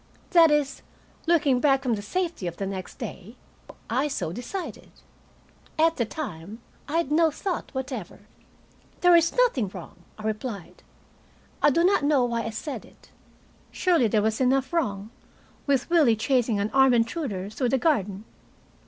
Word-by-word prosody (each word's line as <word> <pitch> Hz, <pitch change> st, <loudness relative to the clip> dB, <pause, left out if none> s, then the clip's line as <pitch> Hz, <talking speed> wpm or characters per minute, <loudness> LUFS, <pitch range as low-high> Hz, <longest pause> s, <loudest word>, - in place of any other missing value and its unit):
That 335 Hz, -3 st, +7 dB
is, 290 Hz, -2 st, 0 dB, 0.5 s
looking 295 Hz, -7 st, +3 dB
back 270 Hz, -1 st, +3 dB
from 250 Hz, -3 st, +1 dB
the 205 Hz, -, -2 dB
safety 330 Hz, -, -3 dB
of 170 Hz, -, -6 dB
the 195 Hz, -, -3 dB
next 190 Hz, -1 st, -6 dB
day, 200 Hz, +6 st, -8 dB, 0.5 s
I 280 Hz, +3 st, 0 dB
so 270 Hz, -, -3 dB
decided. 335 Hz, -, -6 dB, 0.9 s
At 325 Hz, +1 st, +3 dB
the 235 Hz, -, +1 dB
time 210 Hz, -, -7 dB, 0.3 s
I 315 Hz, -, -1 dB
had 335 Hz, -4 st, -1 dB
no 325 Hz, +1 st, +4 dB
thought 350 Hz, +4 st, -4 dB
whatever. 260 Hz, -9 st, -5 dB, 0.8 s
"There 355 Hz, -1 st, +6 dB
is 340 Hz, 0 st, +4 dB
nothing 450 Hz, -, +2 dB
wrong," 185 Hz, -3 st, -10 dB, 0.2 s
I 215 Hz, -, -10 dB
replied. 215 Hz, -3 st, -5 dB, 0.8 s
I -, -, +6 dB
do 335 Hz, +4 st, +2 dB
not 385 Hz, 0 st, +3 dB
know 285 Hz, -4 st, +3 dB
why 235 Hz, -1 st, -1 dB
I -, -, -2 dB
said 270 Hz, +6 st, -6 dB
it. -, -, -20 dB, 0.6 s
Surely 340 Hz, -10 st, +2 dB
there 210 Hz, 0 st, +1 dB
was 220 Hz, +3 st, 0 dB
enough 265 Hz, +3 st, +1 dB
wrong, 210 Hz, -10 st, -1 dB, 0.6 s
with 275 Hz, -2 st, +1 dB
Willie 300 Hz, -10 st, +5 dB
chasing 235 Hz, -2 st, +1 dB
an 205 Hz, +2 st, -1 dB
armed 265 Hz, -2 st, +5 dB
intruder 230 Hz, -, -2 dB
through 250 Hz, +2 st, -1 dB
the 270 Hz, -, +2 dB
garden. 210 Hz, -, 0 dB
260 Hz, 160 wpm, -25 LUFS, 215-310 Hz, 0.9 s, That